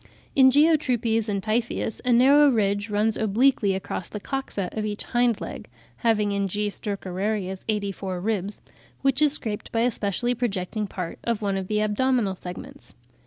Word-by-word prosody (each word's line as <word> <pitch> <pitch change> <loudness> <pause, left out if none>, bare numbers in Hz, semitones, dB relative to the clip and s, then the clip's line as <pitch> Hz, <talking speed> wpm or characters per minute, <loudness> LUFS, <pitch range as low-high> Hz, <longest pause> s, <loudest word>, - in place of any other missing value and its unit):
In 265 -1 +7
Geotrupes 255 -7 +2
and 200 -2 -2
Typhoeus, 225 0 -1
a 250 - +1
narrow 280 +5 +6
ridge 205 -3 0
runs 210 +1 +1
obliquely 220 -1 +2
across 190 -2 -4
(r, - - -6
Fig. - - -28
26) 270 -1 -4
the 200 - 0
coxa - - -8
of - - -1
each 210 0 -3
hind 240 -2 +1
leg - - -7 0.3
(having 215 -3 +1
in 200 0 0
G. 205 +2 -1
stercorarius 195 -1 -3
84 200 -3 -2
ribs), 205 0 -2 0.4
which 270 +1 +2
is 300 -2 +5
scraped 215 -8 -2
by 225 - +1
a 245 +1 +3
specially 220 +4 -1
projecting 215 -3 -2
part 180 -3 -6
of 230 -2 -1
one 200 -1 0
of 190 -1 -3
the 210 +1 0
abdominal 215 -1 +1
segments. 180 -1 -10
215 Hz, 175 wpm, -25 LUFS, 200-240 Hz, 0.4 s, In